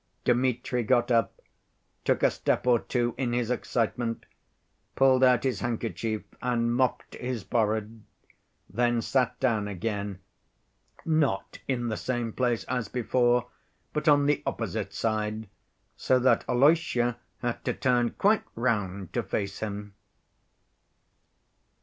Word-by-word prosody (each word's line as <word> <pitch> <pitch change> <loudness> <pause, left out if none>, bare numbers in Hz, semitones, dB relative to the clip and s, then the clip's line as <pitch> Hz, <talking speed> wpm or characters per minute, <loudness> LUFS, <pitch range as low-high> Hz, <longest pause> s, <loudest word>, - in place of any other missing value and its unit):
Dmitri 125 0 +1
got 120 +1 +2
up, 115 -1 +1 0.7
took - - +1
a - - +5
step - - -1
or 120 -2 +4
two 120 -1 -1
in 125 -3 0
his 120 -1 0
excitement, 115 -1 -1 0.7
pulled 130 -1 +4
out 125 -2 +5
his 130 -2 0
handkerchief 115 -2 -2 0.2
and 120 -1 +1
mopped 130 +1 0
his 125 -4 -4
forehead, 110 0 -1 0.7
then 120 +1 +1
sat 125 -2 0
down 110 -6 +1
again, 100 0 -3 0.9
not 155 -3 0
in 120 -3 -1
the 110 - -2
same 120 -3 -2
place 120 -3 0
as 125 -4 -2
before, 120 0 +1 0.4
but 150 +1 -2
on 145 -1 +5
the 145 0 +2
opposite - - -3
side, 110 0 -2 0.5
so 130 - +2
that 125 -2 +3
Alyosha 125 -3 +3 0.2
had 120 -1 -2
to - - +1
turn 125 -2 +2
quite 210 - +2
round 100 -6 -1
to - - +1
face 100 -1 -3
him. 105 -1 -5
120 Hz, 125 wpm, -27 LUFS, 110-125 Hz, 0.9 s, a